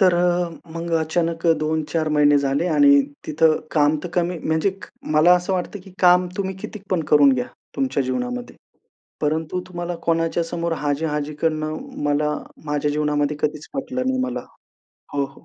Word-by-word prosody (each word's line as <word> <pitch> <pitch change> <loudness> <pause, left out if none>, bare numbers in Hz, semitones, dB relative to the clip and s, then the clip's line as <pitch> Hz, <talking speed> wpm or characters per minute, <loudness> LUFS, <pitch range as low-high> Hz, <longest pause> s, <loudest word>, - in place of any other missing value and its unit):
तर 185 -3 +5
अ, 175 0 +2 0.2
मग 165 +1 -5
अचानक 165 +1 -1
2-4 155 +1 -1
महिने 145 0 +5
झाले 140 +4 0
आणि 145 -3 +6 0.3
तिथं 155 +1 +3
काम 150 0 +3
तर - - -3
कमी 175 0 0
म्हणजे 160 +5 +1
क, 195 +1 -12 0.3
मला 165 +4 +7
असं 180 +2 -1
वाटतं 185 +2 -3
की 190 - -13
काम 180 0 +6
तुम्ही 190 -2 -2
किती 210 0 -8
पण 180 - +2
करून 145 -2 +7
घ्या 125 -1 -2 0.3
तुमच्या 265 - 0
जीवनामध्ये. 245 - -3 0.6
परंतु 160 +4 -1
तुम्हाला 175 -1 -4
कोणाच्या 165 0 +1
समोर 170 0 -3
हाजी-हाजी 150 0 -2
करणं 155 -1 0 0.3
मला 150 +1 +1 0.3
माझ्या 150 0 0
जीवनामध्ये 150 0 0
कधीच 150 0 -2
पटलं 260 -1 -3
नाही 260 0 +1
मला 255 -1 -2 0.7
हो, 140 -1 +1
हो. 140 0 -13
160 Hz, 160 wpm, -22 LUFS, 150-180 Hz, 0.7 s, मला